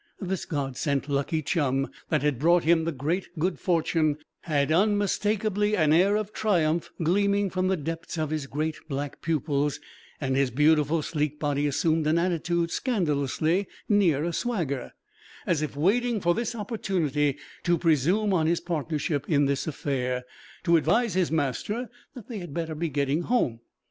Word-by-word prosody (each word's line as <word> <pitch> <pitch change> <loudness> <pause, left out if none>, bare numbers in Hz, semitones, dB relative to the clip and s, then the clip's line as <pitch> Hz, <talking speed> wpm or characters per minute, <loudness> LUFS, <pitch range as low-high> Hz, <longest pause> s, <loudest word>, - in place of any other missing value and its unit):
This 190 -2 -3
God 135 -5 -3
sent 140 -2 -1
lucky 145 +3 0
chum, 135 -3 0 0.2
that 150 -3 +1
had 145 -5 +1
brought 170 +3 +4
him 165 0 +3
the 165 - 0
great 160 +7 -2
good 170 -1 -1
fortune, 160 -3 +1 0.2
had 145 -2 0
unmistakably 205 +2 +1
an 155 -2 +4
air 190 +5 +4
of 215 0 -2
triumph 170 -6 +1
gleaming 200 +3 +2
from 185 0 0
the 190 0 +1
depths 165 +2 -5
of 155 -1 -1
his 155 -3 -2
great 155 +3 -2
black 140 0 -4
pupils, 150 -2 0 0.4
and 135 -2 -1
his 135 -1 +2
beautiful 150 +3 +3
sleek 150 -1 -2
body 145 -1 0
assumed 155 +2 +1
an 155 +2 +3
attitude 170 -1 0
scandalously 165 - 0 0.2
near 180 -9 +3
a 170 +1 -2
swagger, 165 - -2 0.5
as 165 -3 +1
if 155 -2 -3
waiting 225 +8 +2
for 175 -2 +2
this 235 +3 -2
opportunity 175 - -1 0.2
to 175 -1 +2
presume 170 +7 +2
on 160 -3 +2
his 170 +1 +2
partnership 155 -3 -2
in 145 -3 +3
this 140 +2 -1
affair, 125 -4 -2 0.4
to 170 -1 +5
advise 230 +6 +2
his 185 -1 +1
master 160 - -1 0.2
that 240 -6 -10
they 230 -5 -5
had 175 -6 -8
better 165 -2 -2
be 165 +2 -2
getting 140 +2 0
home. 175 - 0
160 Hz, 165 wpm, -26 LUFS, 145-185 Hz, 0.5 s, to